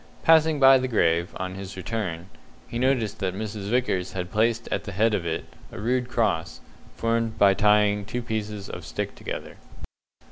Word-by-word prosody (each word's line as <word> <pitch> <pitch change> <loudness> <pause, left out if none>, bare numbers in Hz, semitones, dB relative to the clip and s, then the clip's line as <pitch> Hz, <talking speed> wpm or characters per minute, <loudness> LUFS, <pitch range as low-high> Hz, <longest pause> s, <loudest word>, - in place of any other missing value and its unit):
Passing 160 -2 +5
by 135 -1 +8
the 130 - -1
grave, 85 -7 +2
on 95 0 -3
his 95 0 -8
return, 95 -3 -4 0.4
he 120 - -4
noticed 125 -5 +1
that 95 -1 -2
Mrs. 105 -1 -5
Vickers 115 -7 0
had 90 -1 -4
placed 115 +2 +1
at - - -2
the 100 - -6
head 110 +3 +2
of 90 -5 -1
it 80 - -2 0.3
a - - -8
rude 125 +3 0
cross, 105 -10 0 0.4
formed 115 -1 -1
by 100 -1 +6
tying 105 0 +3
two 125 +3 -4
pieces 105 -3 -4
of - - -7
stick - - -4
together. - - -7
105 Hz, 175 wpm, -25 LUFS, 95-115 Hz, 0.4 s, by